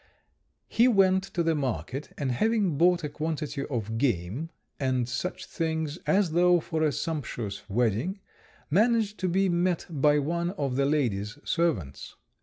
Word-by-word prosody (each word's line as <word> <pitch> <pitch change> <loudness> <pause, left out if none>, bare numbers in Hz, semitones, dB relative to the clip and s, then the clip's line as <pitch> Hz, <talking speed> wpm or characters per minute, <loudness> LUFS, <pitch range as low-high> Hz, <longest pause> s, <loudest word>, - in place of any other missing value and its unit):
He 235 +2 +4
went 190 -5 +4
to 180 -3 -2
the 165 0 +2
market, 130 - -3
and 140 -3 -1
having 210 - +1
bought 175 +3 +3
a 150 - -2
quantity 150 -2 -3
of 115 -4 -3
game 120 - -1 0.3
and 130 -3 0
such 180 +9 -4
things, 160 -3 -2
as 195 -4 +3
though 175 +1 +4
for 160 -1 -3
a 155 -1 +3
sumptuous 120 -10 -4
wedding, 120 - 0 0.5
managed 215 +2 +2
to 185 - 0
be 190 +3 +2
met 175 -1 +1
by 150 -1 +3
one 170 +4 -1
of 140 -5 -1
the 140 +1 +2
lady's 115 -6 0
servants. 130 - -1
155 Hz, 150 wpm, -27 LUFS, 130-180 Hz, 0.5 s, He